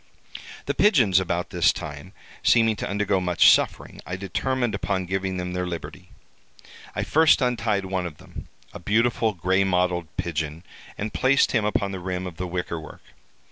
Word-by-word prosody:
"The - - -1
pigeons 120 - +4
about 90 -1 -2
this - - +3
time 75 +6 -8 0.3
seeming 115 -2 +4
to - - -4
undergo 100 -1 0
much 90 -1 +5
suffering, - - 0
I 90 - -5
determined 120 +6 -2
upon 95 -2 -2
giving 95 0 -2
them 90 0 -4
their 90 0 -2
liberty. 85 -2 -7 0.9
I - - -1
first 160 0 +4
untied 115 -6 0
one 95 -1 -2
of 75 -3 -11
them, - - -11 0.3
a - - -8
beautiful 110 +3 +1
gray 95 +3 +1
mottled 90 -2 0
pigeon, 80 0 -3 0.3
and 105 +1 -4
placed 135 +2 +3
him 110 -4 +1
upon 100 -1 0
the 95 - -5
rim 90 0 -4
of 90 -3 -8
the 90 - -3
wicker 90 -1 -3
work. 80 - -12
95 Hz, 170 wpm, -24 LUFS, 90-110 Hz, 0.9 s, much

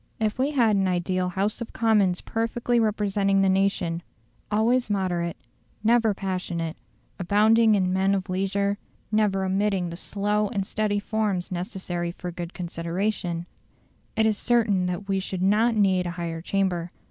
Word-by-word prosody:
If 220 +2 -1
we 270 +2 +2
had 235 -8 +3
an 195 -1 +2
ideal 180 0 0
House 200 +5 -1
of 235 - -6
Commons 210 -6 +2
perfectly 235 +1 0
representing 200 -2 +2
the 190 - +3
nation, 190 -3 +1 0.5
always 225 +3 +2
moderate, 180 -4 -1 0.5
never 225 -2 +3
passionate, 180 -4 -3 0.4
abounding 215 +4 +4
in 185 -2 +1
men 190 +1 +2
of 190 -1 -3
leisure, 200 +2 0 0.3
never 205 -3 +2
omitting 190 -2 0
the - - -5
slow 205 +3 -1
and 200 -3 -2
steady 210 0 0
forms 205 -3 -1
necessary 175 -2 -3
for 180 0 -6
good 175 0 -7
consideration, 175 0 -2 0.7
it 220 - +3
is 215 -2 +1
certain 215 -7 +2
that 180 +3 -4
we 195 -1 +1
should 185 -1 -3
not 220 +4 +3
need 190 -4 +2
a 175 +1 -5
higher 165 -1 -4
chamber. 180 -2 -1
195 Hz, 150 wpm, -25 LUFS, 180-215 Hz, 0.7 s, abounding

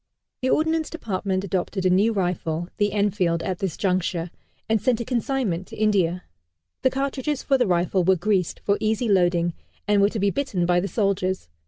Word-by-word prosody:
The 260 - 0
Ordnance 320 +1 +1
Department 195 - -2
adopted 190 0 -2
a - - +5
new 200 +5 +4
rifle, 175 -4 -2
the 205 -1 +1
Enfield, 190 -5 +1
at 185 -2 -3
this 190 -5 -3
juncture, 180 -3 -1 0.4
and 220 -2 +1
sent 240 +1 +2
a 235 - -3
consignment 235 -7 -1
to - - -10
India. 185 -5 +1 0.6
The 260 - +4
cartridges 275 +1 -2
for 275 - +2
the 250 -4 +2
rifle 180 +1 +1
were 190 +2 +4
greased, 185 -1 0
for 200 0 +1
easy 220 +2 0
loading, 175 -3 +2 0.3
and 205 -1 +4
were 200 - +5
to 220 - -4
be 200 0 +2
bitten 205 -11 -1
by 175 0 +3
the 190 - -2
soldiers. 190 - -1
200 Hz, 185 wpm, -24 LUFS, 180-225 Hz, 0.6 s, a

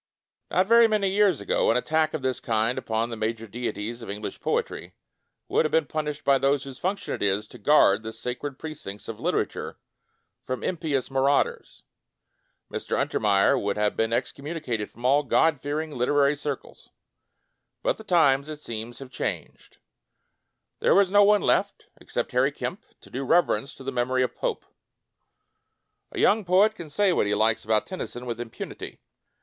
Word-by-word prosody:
Not 185 +3 +2
very 230 +2 +6
many 210 -3 +1
years 195 -5 +3
ago, - - +1
an 115 - +4
attack 155 +4 +1
of 150 - -5
this 130 -1 0
kind 115 +1 0
upon 115 +1 -2
the - - -3
major 110 +1 -3
deities 115 0 -4
of 115 - -8
English 105 +1 -5
poetry - - -2 0.5
would - - +2
have 155 - -1
been 160 -2 +3
pun 155 +1 -3
ished 150 0 -5
by 140 -1 +4
those 140 0 +2
whose 135 -2 -9
function 195 +2 -2
it - - -5
is 100 +1 +1
to - - -12
guard 145 -9 +5
the 110 0 -6
sacred 130 +4 -5
precincts 145 -11 -7
of 110 -2 -6
litera - - +1
ture - - -8 0.6
from 130 0 -4
impious 150 -7 -1
marauders. 135 +1 0 0.9
Mr. - - -2
Untermeyer 100 -2 +2
would 100 0 -1
have 105 0 +1
been 115 0 +1
excom 140 +4 -3
municated 135 -10 -3
from 120 +2 -10
all 140 +3 +5
God 150 +1 +2
fearing 150 +2 -3
liter 125 +4 +1
ary 140 +1 +4
circles.... 145 -2 -6 0.9
But - - 0
the - - -9
times, 145 -7 +3
it 155 -1 -6
seems, 115 -2 -5
have 135 -1 -10
changed. - - -5 1.0
There - - +4
is 195 -2 +3
no 205 0 +6
one 205 0 +4
left, - - 0
except - - -4
Harry - - +2
Kemp, - - -5 0.2
to - - -16
do 135 - -3
rever 175 +6 +3
ence 140 - -6
to - - -12
the 135 - -3
memory 130 +1 +1
of 125 - -3
Pope. - - -3 1.5
A - - -9
young 215 +1 +3
poet 195 +4 +4
can 170 -7 -9
say 195 +4 +2
what 105 - +1
he 105 - +1
likes 110 +1 +2
about 110 -1 +1
Tennyson 125 -9 -6
with 120 -2 -4
impunity. 115 -2 -8
135 Hz, 180 wpm, -26 LUFS, 115-160 Hz, 1.5 s, very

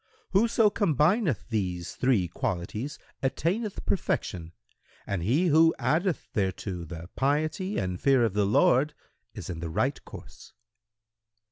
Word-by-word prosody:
Whoso 225 +1 +4
combineth 165 - +1
these 90 -6 -2
three 120 -9 +2
qualities 95 - -4 0.2
attaineth 185 - -1
perfection, 85 - -2 0.5
and 100 -3 -2
he 130 - +2
who 160 +2 +5
addeth 175 +2 0
thereto 95 -2 -2
the 85 +1 -9
piety 155 +9 0
and 90 -1 -2
fear 135 -4 +4
of 110 - -1
the 100 -1 +2
Lord 135 +8 +3 0.4
is - - -7
in 85 -2 -5
the 85 0 -4
right 80 - -1
course." - - -12
130 Hz, 125 wpm, -27 LUFS, -, 0.5 s, who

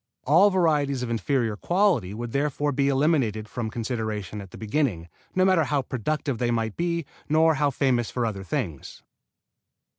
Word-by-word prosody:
All 170 +9 +5
varieties 150 -8 +1
of 120 - -3
inferior 115 -1 0
quality 175 - +1
would 115 +2 -5
therefore 145 +1 0
be 140 0 +1
eliminated 135 -7 +1
from 110 +2 -4
consideration 110 -3 -4
at 100 - -11
the - - -12
beginning, 110 - -1 0.3
no 185 0 +4
matter 185 -5 +4
how 140 -1 0
productive 135 +1 -2
they 120 - +1
might 115 -2 -1
be, 170 -2 -1 0.2
nor 160 +1 +4
how 145 0 +1
famous 125 -4 +1
for 120 -2 -1
other 100 -4 -3
things. 95 - -4
130 Hz, 160 wpm, -25 LUFS, 110-150 Hz, 0.3 s, All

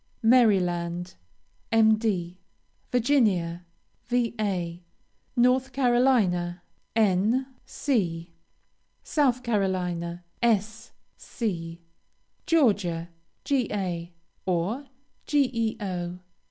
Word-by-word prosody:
Maryland, 180 -7 +3 0.6
Md. 215 -5 +2 0.5
Virginia, 205 -10 +1 0.4
Va. 210 -8 -1 0.6
North 250 +1 +3
Carolina, 235 -10 +2 0.3
N. 220 +4 +2 0.2
C. 170 - -1 0.7
South 255 -5 +1
Carolina, 180 -6 -1 0.2
S. 220 0 0 0.3
C. 170 -7 -4 0.6
Georgia, 200 - +2 0.4
Ga., 195 -10 -1 0.4
or, 190 +10 -1 0.4
Geo. 220 -10 -1
205 Hz, 60 wpm, -26 LUFS, 175-240 Hz, 0.7 s, Maryland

